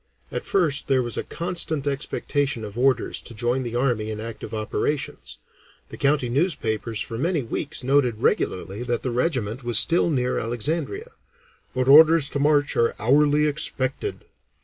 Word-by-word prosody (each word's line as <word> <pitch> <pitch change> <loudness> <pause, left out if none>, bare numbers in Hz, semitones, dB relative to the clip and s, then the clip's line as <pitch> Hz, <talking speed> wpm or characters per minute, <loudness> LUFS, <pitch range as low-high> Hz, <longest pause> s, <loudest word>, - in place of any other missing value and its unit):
At - - -5
first 165 -8 +1
there 130 -2 +2
was 120 -1 -3
a - - -2
constant 170 -4 -1
expectation 140 -3 -2
of 105 0 -9
orders 130 -1 +1
to 115 - -10
join 120 +4 0
the 120 -2 -5
army 120 -4 0
in 110 -1 -5
active 115 0 -7
operations; 110 +6 -3 0.5
the - - -8
county 140 -2 +1
newspapers 120 - -1
for 115 0 -4
many 165 -1 0
weeks 135 +4 -5
noted 125 -4 +2
regularly 95 +2 -1
that 120 -1 -2
the 125 - -2
regiment 125 -3 -1
was 120 -2 +1
still 170 +6 +4
near 125 -5 0
Alexandria, 165 - -3 0.6
"but 130 0 0
orders 155 +1 +7
to 145 - -3
march 145 0 +2
are 115 0 +2
hourly 145 +5 +3
expected." 135 -3 -1
130 Hz, 155 wpm, -23 LUFS, 120-150 Hz, 0.6 s, orders